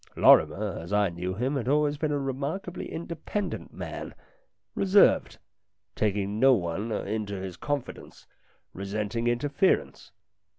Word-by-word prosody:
Lorrimer, 105 -2 +4
as 85 +3 -9
I 105 -1 +3
knew 90 +2 -4
him, 130 +7 -1
had 125 - -3
always 145 +1 +2
been 155 -1 0
a 145 - +1
remarkably 140 +7 -4
independent 170 +5 -4
man, - - -7 0.6
reserved, 195 - +4 0.6
taking 105 0 -1
no 135 +1 +6
one 95 +3 -3
into 105 -1 -3
his 95 -2 -6
confidence, 145 -3 -5 0.5
resenting 105 +4 -3
interference. 120 - 0
115 Hz, 120 wpm, -27 LUFS, 100-145 Hz, 0.6 s, no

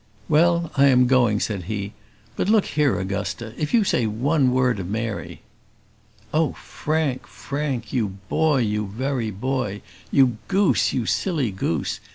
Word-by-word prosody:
"Well, 170 +1 +3
I 140 -1 +5
am 125 -2 +5
going," 120 -5 +3
said 100 -6 -3
he; 100 0 -4 0.4
"but - - -1
look 215 -2 +4
here 150 -4 +1
Augusta, 100 +3 -4
if 150 -1 -3
you 230 -3 +4
say 120 - +1
one 130 +5 +1
word 125 -4 +2
of 90 -1 -5
Mary 110 0 -4 0.5
" - - -32
Oh, 155 0 +2
Frank! 150 -4 -2
Frank! 140 -5 -4
you 115 -5 +1 0.2
boy, 155 -5 +2
you 105 -2 -1
very 125 +2 -2
boy! 105 -1 -3 0.3
you 130 -5 +3
goose, 195 -1 +2
you 120 - -1
silly 150 - 0
goose! 85 -5 -2
125 Hz, 155 wpm, -23 LUFS, 105-150 Hz, 0.5 s, I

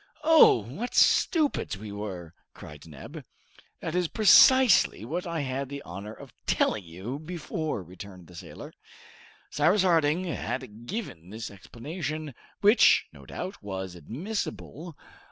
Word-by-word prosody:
"Oh! 310 - +6
what 190 - -6
stupids 305 - +2
we 105 +1 -9
were!" 95 -5 -7 0.2
cried 75 +1 -12
Neb. 75 -4 -10 0.6
"That 160 - -4
is 180 -1 +1
precisely 220 - +5
what 175 +8 -4
I 165 -2 -2
had 135 0 -3
the 140 0 -7
honor 100 +5 -8
of - - -13
telling 105 - +1
you 95 - -7
before!" 155 - -4
returned 90 +1 -12
the 90 - -16
sailor. 85 - -10 0.8
Cyrus 200 -1 +3
Harding 165 -1 +2
had 125 - -5
given 95 - -6
this 110 +1 -7
explanation, 150 - -6 0.3
which, 210 +4 +5
no - - -15
doubt, 185 - -7
was 95 -2 -6
admissible. 155 - -6
135 Hz, 130 wpm, -27 LUFS, -, 0.8 s, Oh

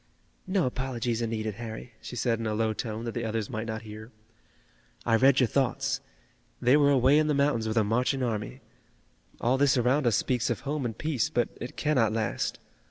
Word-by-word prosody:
"No 185 -4 +1
apologies 125 -2 -2
are 115 - 0
needed, 110 -1 -3
Harry," 115 +1 -7
she - - -8
said 115 -1 0
in 115 - -2
a 105 - -1
low 110 0 +1
tone 110 +1 -4
that 115 - -2
the 120 - -3
others 110 -2 -2
might 110 +1 -4
not 110 0 -4
hear. 110 +2 -10 0.9
"I 115 - +3
read 135 +3 +5
your 130 - +5
thoughts. 130 +1 0 0.6
They 125 +3 +4
were 145 -1 +5
away 135 +2 +5
in 155 - +2
the 150 - +2
mountains 140 -6 +1
with 110 +1 -2
a 110 - +5
marching 125 +5 0
army. 105 - -3 0.8
All 130 +3 +1
this 140 -1 +4
around 125 +3 +2
us 115 - +3
speaks 125 +1 0
of 120 - -2
home 145 -1 -2
and 115 -2 -4
peace, 155 -7 0
but 120 - 0
it 120 - -7
cannot 130 -8 +2
last. 110 -1 -1
120 Hz, 205 wpm, -28 LUFS, 110-135 Hz, 0.9 s, read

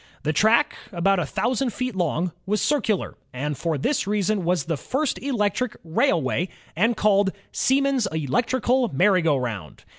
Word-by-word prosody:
The 155 - 0
track, 220 +7 +3 0.2
about 195 +1 +2
a 165 - -2
thousand 240 - -1
feet 255 -2 -3
long, 175 0 0 0.2
was 210 +2 +1
circular, 240 -9 0 0.2
and 145 +4 -3
for 165 +1 -2
this 250 - 0
reason 205 -1 0
the 170 -2 0
first 270 - -2
electric 250 -2 -1
railway 170 - +1 0.3
was 225 +8 +3
called 200 -1 +3 0.2
*'Siemens's 270 -4 +2
electrical 240 - +1
merry 185 +6 +3
go 160 -3 +2
roimd." 110 - -5
195 Hz, 145 wpm, -24 LUFS, 165-245 Hz, 0.3 s, track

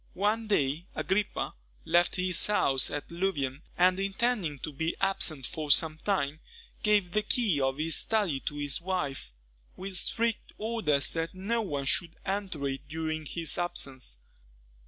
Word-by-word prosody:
One 215 +4 +1
day, 155 -3 +1
Agrippa 195 +2 -1 0.3
left 175 +1 +3
his 180 -1 +3
house 135 -10 +3
at 145 +2 -5
Louvain, 150 -7 -1 0.2
and 185 +1 +4
intending 195 -5 0
to 155 - -5
be 160 +4 -1
absent 170 -8 +2
for 155 +1 -4
some 155 +2 +4
time, 155 -7 0 0.4
gave 205 -4 +3
the 210 - +2
key 210 - +1
of 135 0 +1
his 155 0 +2
study 205 -11 +1
to 145 - -2
his 145 +1 -1
wife, 150 - -2 0.5
with 190 0 -5
strict 230 +4 +1
orders 210 -10 +1
that 165 +2 -2
no 220 +5 0
one 145 -9 -3
should 170 +5 0
enter 190 -7 -2
it 135 +1 -5
during 155 0 -3
his 165 +2 +1
absence. 135 - -1
170 Hz, 150 wpm, -29 LUFS, 145-195 Hz, 0.5 s, and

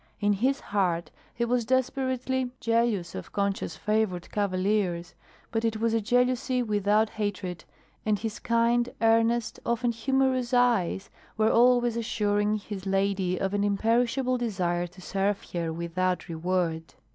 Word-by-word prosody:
In 205 0 +2
his 260 +8 +1
heart 175 -5 -1 0.2
he 235 - 0
was 240 0 +1
desperately 260 +1 0
jealous 230 -6 +1
of 90 - -7
Concha's 200 -5 -1
favored 210 -4 -1
cavaliers, 185 -3 0 0.4
but 225 0 -1
it 225 -1 0
was 225 +1 0
a 225 - +2
jealousy 250 +3 +1
without 210 0 +2
hatred, 190 -5 -4 0.4
and 215 -1 +1
his 220 +1 -5
kind, 235 +1 +2
earnest, 230 +1 +2
often 235 +1 0
humorous 255 +1 +1
eyes, 225 -6 +2 0.3
were 220 0 +3
always 240 0 +4
assuring 210 -2 0
his 205 -2 -6
lady 195 -2 0
of 195 0 -1
an 205 0 +1
imperishable 235 +5 +1
desire 180 -6 -1
to 180 +2 -16
serve 195 +2 -1
her 170 -2 -2
without 175 +2 -2
reward. 165 -1 -2
215 Hz, 135 wpm, -27 LUFS, 190-235 Hz, 0.4 s, always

